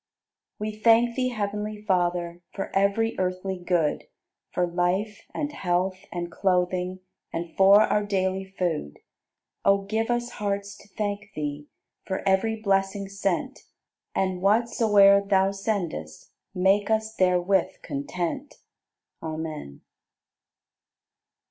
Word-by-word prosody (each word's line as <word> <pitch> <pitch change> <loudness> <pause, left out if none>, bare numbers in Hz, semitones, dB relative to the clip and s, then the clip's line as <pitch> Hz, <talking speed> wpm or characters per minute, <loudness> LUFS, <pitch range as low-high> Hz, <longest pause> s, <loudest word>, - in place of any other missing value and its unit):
78. 210 - -3
We 215 0 -6
thank 235 +1 +5
Thee, 255 -1 +1
heav'nly 210 -1 -3
Father, 175 -2 0
For 195 - -5
ev'ry 200 +4 +2
earthly 185 0 -2
good, 170 -4 +1 0.5
For 180 - +1
life, 180 +4 -1
and 295 -1 -3
health, 185 -3 -1
and 175 -1 -4
clothing, 180 0 0 0.3
And 165 0 -5
for 195 +2 +7
our 210 - +1
daily 190 -1 0
food. 160 - -2 0.7
O 200 0 +4
give 220 +3 -1
us 240 0 0
hearts 200 -1 -3
to - - -17
thank 205 0 -4
Thee, 150 -1 -4 0.4
For 190 +1 -3
ev'ry 195 +4 +2
blessing 195 -1 0
sent, 195 +5 -2 0.6
And 185 -1 0
whatsoe'er 205 -1 +5
Thou 195 -1 +3
sendest 185 - -4 0.2
Make 195 +3 +3
us 220 0 +1
therewith 185 0 +1
content. 170 - -4 0.7
Amen. 155 - -6
195 Hz, 115 wpm, -26 LUFS, 180-210 Hz, 0.7 s, for